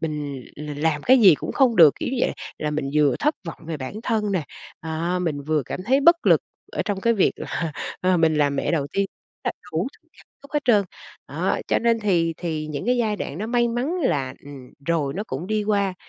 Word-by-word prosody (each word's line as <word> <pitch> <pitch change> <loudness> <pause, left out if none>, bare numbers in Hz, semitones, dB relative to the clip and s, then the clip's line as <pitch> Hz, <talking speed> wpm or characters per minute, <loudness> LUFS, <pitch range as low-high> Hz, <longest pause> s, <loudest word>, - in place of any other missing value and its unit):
mình 150 -4 -4 0.2
l 150 0 -6
làm 150 -1 0
cái 260 - +6
gì 190 -7 +8
cũng - - -5
không 255 -5 +3
được, 160 -5 +8
kiểu - - -1
như - - -1
vậy. - - +1 0.3
Là 150 -1 -2
mình 145 -2 -2
vừa 150 -2 +3
thất 300 +2 +1
vọng 165 - -6
về 160 -2 -3
bản 130 +6 -6
thân 215 -4 0
nè, 180 -6 0 0.4
à, 165 +3 -2
mình 155 -5 -2
vừa 155 -1 0
cảm 155 - -6
thấy 265 +5 +3
bất 340 +4 +5
lực - - +5 0.3
ở - - -1
trong 205 -3 -2
cái 230 +3 +3
việc 200 - +3
là, 165 -3 -4 0.3
ờ, 185 0 +3
mình 160 -2 +3
làm 145 -2 +2
mẹ - - 0
đầu 150 -4 0
tiên 200 0 +1 0.4
á - - -1 0.2
đủ - - 0
thứ - - -26
cảm - - -20 0.2
xúc 280 - -15
hết 295 - +3
trơn. 210 -5 +4 0.4
Đó, - - -1
cho - - +3
nên 230 -1 +2
thì 170 -6 +1
thì 160 -3 -3
những 150 +4 -5
cái 250 +1 +3
giai 220 -3 0
đoạn 150 -5 -5
nó 210 - -3
may 240 0 +2
mắn 250 +9 -1
là, 135 - 0
ừm, 140 -3 -11
rồi 155 -5 0
nó 200 +4 -3
cũng 145 -1 -5
đi 215 +1 0
qua, 200 -2 +1
170 Hz, 240 wpm, -23 LUFS, 150-215 Hz, 0.4 s, gì